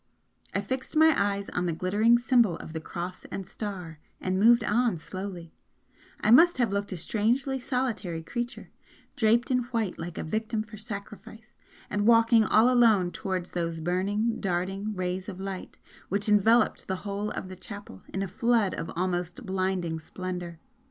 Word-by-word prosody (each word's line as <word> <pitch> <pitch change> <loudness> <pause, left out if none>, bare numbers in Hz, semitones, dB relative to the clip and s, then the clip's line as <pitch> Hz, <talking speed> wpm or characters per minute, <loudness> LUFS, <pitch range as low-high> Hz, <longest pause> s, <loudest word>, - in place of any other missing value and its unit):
I 200 - 0
fixed 260 +9 -4
my 315 +1 +6
eyes 200 0 0
on 180 0 -1
the - - +1
glittering 205 +8 +3
symbol 240 -6 +3
of 160 - -9
the 160 - -4
Cross 180 +3 -6
and 195 - -6
Star 180 -5 -6 0.2
and 185 0 -1
moved 235 +3 +6
on 235 -2 +2
slowly 180 -1 -7 0.7
I 215 - +3
must 335 +7 +7
have 235 -6 +1
looked 200 0 -2
a 185 - -3
strangely 240 - 0
solitary 235 -10 -2
creature, 240 +8 -5 0.4
draped 235 -1 +3
in 250 - +3
white 230 -6 -2
like 170 0 -6
a - - -3
victim 220 +4 -2
for 215 0 -12
sacrifice 215 +1 -9 0.3
and 205 +1 0
walking 230 -1 +6
all 220 +2 +5
alone 225 -8 +4
towards 185 +1 -3
those 170 -2 -2
burning, 200 +7 0
darting 195 +3 -2
rays 185 +1 -3
of 185 -2 -8
light 195 -1 -6 0.3
which 200 +3 0
enveloped 215 +2 +3
the 190 - -1
whole 200 +1 -2
of 190 - -5
the 185 - -8
chapel 195 - -10
in 195 - -2
a - - -3
flood 230 0 +1
of 165 - -4
almost 175 +4 -2
blinding 185 -4 -1
splendour. 180 0 -6
200 Hz, 165 wpm, -28 LUFS, 180-230 Hz, 0.7 s, must